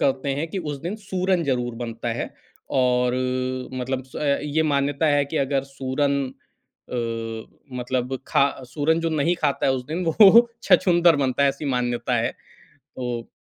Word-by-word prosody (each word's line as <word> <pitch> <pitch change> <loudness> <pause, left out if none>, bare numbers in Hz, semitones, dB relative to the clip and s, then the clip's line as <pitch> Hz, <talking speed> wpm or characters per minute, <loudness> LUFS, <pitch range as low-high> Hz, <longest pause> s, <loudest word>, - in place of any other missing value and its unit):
करते 135 +1 +1
हैं 150 +4 -2
कि 190 - -4
उस 150 -4 -4
दिन 185 +6 -4
सूरन 185 -4 -1
ज़रूर 125 -3 -1
बनता 115 0 -5
है। 120 - -3 0.4
और 125 -1 +2
अ, 130 0 -2
मतलब 130 +1 -2
स 130 - -12 0.3
ये 150 +2 0
मान्यता 145 +1 +1
है 145 -1 +3
कि 155 +3 -5
अगर 135 -1 0
सूरन 140 +1 0
अ, 115 0 -8
मतलब 125 +1 -2
खा 140 - +4 0.3
सूरन 160 +2 +2
जो 165 0 -1
नहीं 160 +3 +1
खाता 140 -2 +1
है 135 - +4
उस 125 -1 -3
दिन 170 +4 -3
वो 215 +7 +7
छछूंदर 175 -3 +5
बनता 135 -1 +1
है, 140 - +5
ऐसी 140 +2 -4
मान्यता 120 -1 -1
है। - - 0 0.5
तो 120 -2 -6
135 Hz, 165 wpm, -23 LUFS, 125-160 Hz, 0.5 s, वो